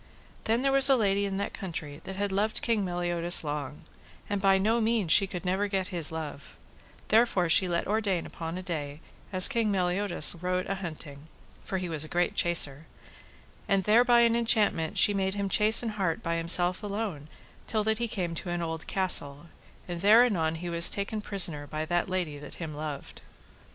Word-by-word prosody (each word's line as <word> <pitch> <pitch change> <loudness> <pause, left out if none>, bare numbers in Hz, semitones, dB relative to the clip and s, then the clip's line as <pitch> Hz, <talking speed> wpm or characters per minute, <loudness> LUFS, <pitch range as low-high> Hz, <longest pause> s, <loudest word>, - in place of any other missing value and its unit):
Then 230 +3 0
there 275 - +1
was 275 0 +6
a 270 - +6
lady 200 -3 0
in 195 -1 -4
that 200 - -4
country 160 -6 -7
that 190 - -7
had 200 +1 -3
loved 210 +3 -2
King 225 -4 0
Meliodas 175 -1 0
long, 145 -1 -6 0.5
and 200 -1 -2
by 195 -1 +3
no 220 +4 0
mean 220 -4 0
she 195 +4 +3
never 190 +2 -1
could 205 - -7
get 190 -1 -1
his 170 -5 +2
love; 150 -3 -8 0.5
therefore 215 -6 +2
she 185 +3 +5
let 170 -1 -2
ordain 205 -4 -1
upon 165 +1 -7
a 185 - -7
day, 150 -5 -6 0.3
as 185 -2 +7
King 230 -5 -1
Meliodas 180 -2 +2
rode 180 0 -2
a 195 - -3
hunting, 155 -6 -9 0.4
for 190 - -4
he 180 -1 -4
was 160 -3 -2
a - - -6
great 175 +2 -1
chaser, 160 -3 +3 0.8
and 195 -1 +1
there 220 +4 +4
by 240 -1 +4
an 235 -1 +3
enchantment 215 -8 0
she 205 - +6
made 190 0 -2
him 200 -1 -3
chase 215 +4 +5
an 230 - -2
hart 200 -1 -3
by 170 0 -2
himself 175 +2 +2
alone 200 -8 -5 0.4
till 215 -2 -1
that 220 +1 -1
he 235 - -1
came 180 -6 -4
to 170 +2 -7
an 175 0 -3
old 160 -1 -6
castle, 170 -5 +1 0.4
and 175 -1 -6
there 215 +5 +6
anon 165 -9 -1
he 175 +2 -7
was 170 0 +2
taken 205 +2 -3
prisoner 170 -8 0
by 155 +2 -5
the 175 +1 0
lady 180 -6 -4
that 150 - -11
him 160 -3 -7
loved. 150 -2 -8
185 Hz, 195 wpm, -27 LUFS, 165-205 Hz, 0.8 s, as